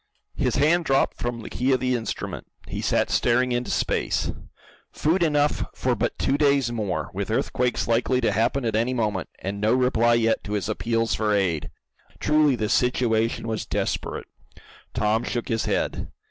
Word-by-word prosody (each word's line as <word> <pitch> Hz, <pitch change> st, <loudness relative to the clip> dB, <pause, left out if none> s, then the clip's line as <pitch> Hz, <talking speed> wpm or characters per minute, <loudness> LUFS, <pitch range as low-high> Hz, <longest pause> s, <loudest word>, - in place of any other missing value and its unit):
His -, -, 0 dB
hand 160 Hz, +5 st, +3 dB
dropped 135 Hz, -2 st, +2 dB
from 120 Hz, -1 st, -3 dB
the -, -, -7 dB
key 130 Hz, +2 st, +1 dB
of 130 Hz, -, +2 dB
the 130 Hz, 0 st, 0 dB
instrument. 115 Hz, -2 st, -4 dB, 0.2 s
He -, -, -4 dB
sat -, -, +1 dB
staring 125 Hz, +1 st, +2 dB
into 120 Hz, 0 st, -1 dB
space. -, -, 0 dB, 0.6 s
Food 165 Hz, +5 st, +1 dB
enough 150 Hz, -3 st, +2 dB
for -, -, 0 dB
but -, -, -2 dB
two 140 Hz, +2 st, +1 dB
days 140 Hz, -4 st, +3 dB
more, 100 Hz, -9 st, -2 dB
with -, -, -3 dB
earthquakes 125 Hz, -1 st, 0 dB
likely 120 Hz, +2 st, +2 dB
to 115 Hz, -, +2 dB
happen 115 Hz, +5 st, +1 dB
at 110 Hz, -2 st, 0 dB
any 120 Hz, +3 st, +1 dB
moment, 105 Hz, -6 st, -1 dB
and 100 Hz, +1 st, -5 dB
no 110 Hz, +3 st, +3 dB
reply 120 Hz, -2 st, +3 dB
yet 115 Hz, -1 st, +1 dB
to 105 Hz, -, -4 dB
his 105 Hz, -2 st, -1 dB
appeals 115 Hz, 0 st, 0 dB
for 105 Hz, +2 st, +1 dB
aid! 85 Hz, -7 st, 0 dB, 0.5 s
Truly 150 Hz, -3 st, +3 dB
the 110 Hz, -2 st, -1 dB
situation 115 Hz, -2 st, +1 dB
was 110 Hz, -1 st, -3 dB
desperate. -, -, -2 dB, 0.7 s
Tom 110 Hz, +2 st, +1 dB
shook 120 Hz, -2 st, -3 dB
his 115 Hz, -1 st, 0 dB
head. -, -, -1 dB
120 Hz, 175 wpm, -24 LUFS, 110-130 Hz, 0.7 s, hand